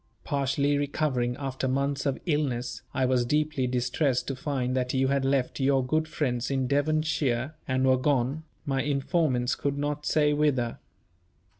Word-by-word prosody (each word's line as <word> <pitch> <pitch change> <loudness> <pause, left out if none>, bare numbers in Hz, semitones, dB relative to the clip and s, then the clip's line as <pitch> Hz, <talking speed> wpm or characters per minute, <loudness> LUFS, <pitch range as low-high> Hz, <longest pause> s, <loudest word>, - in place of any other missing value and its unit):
Partially 140 +1 +1
recovering, 140 -4 0
after 135 -2 -3
months 140 +2 0
of 135 - 0
illness, 140 -7 -1
I 130 0 +1
was 125 -1 +2
deeply 150 0 0
distressed 125 +2 0
to 135 - -2
find 130 -2 -2
that 125 0 -1
you 130 0 +2
had 140 -1 +1
left 135 -1 0
your 135 -1 +2
good 155 +4 0
friends 125 -6 -1
in 135 -1 0
Devonshire, 145 -2 0
and 130 0 +1
were 130 0 +5
gone, 135 +1 +1 0.2
my 135 -1 0
informants 140 -3 +1
could 140 0 -2
not 145 +1 -2
say 150 -1 +3
whither. 140 -6 +1
135 Hz, 155 wpm, -27 LUFS, 130-145 Hz, 0.2 s, were